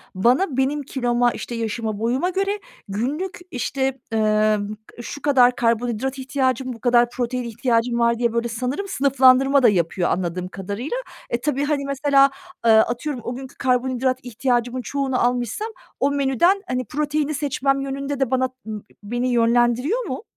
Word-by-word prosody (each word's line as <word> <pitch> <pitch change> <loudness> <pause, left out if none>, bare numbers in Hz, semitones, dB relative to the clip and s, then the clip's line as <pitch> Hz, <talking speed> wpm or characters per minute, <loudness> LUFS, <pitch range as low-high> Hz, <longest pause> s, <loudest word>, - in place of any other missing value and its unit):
bana, 255 - +2
benim 280 +3 +1
kiloma, 245 -2 +1
işte, 240 - -6
yaşıma, 220 -2 -3
boyuma 255 +10 0
göre 395 +2 -1 0.3
günlük, 275 - -3
işte, 265 +1 -2
eee, 215 -1 +3 0.4
şu 285 +4 -7
kadar 250 -4 +4
karbonhidrat 240 +3 0
ihtiyacım, 260 -1 -1
bu 230 - -12
kadar 240 0 +4
protein 250 0 -2
ihtiyacım 235 0 0
var 235 0 +3
diye 235 -2 +1
böyle 235 0 0
sanırım 255 - -3
sınıflandırma 270 -2 +4
da 240 - +8
yapıyor, 175 -1 0
anladığım 180 0 -2
kadarıyla. 205 - -4 0.3
E, 235 - -1
tabii, 285 0 0
hani, 285 -2 -1
mesela, 275 0 +3 0.3
eee, 230 - +6
atıyorum, 240 +4 +2
o 240 - -4
günkü 265 +1 -9
karbonhidrat 255 0 +1
ihtiyacımın 245 +1 -1
çoğunu 270 0 -1
almışsam, 245 - -1 0.3
o 280 - +2
menüden, 285 - +2
hani, 255 -1 -2
proteini 300 +3 -1
seçmem 275 -1 0
yönünde 275 +1 -3
de 265 -2 0
bana, 260 0 +2 0.2
ımm, 215 -1 -4
ı 205 - -12 0.2
beni 240 +4 -2
yönlendiriyor 240 - +2
mu? 350 - -5
255 Hz, 155 wpm, -22 LUFS, 235-275 Hz, 0.4 s, da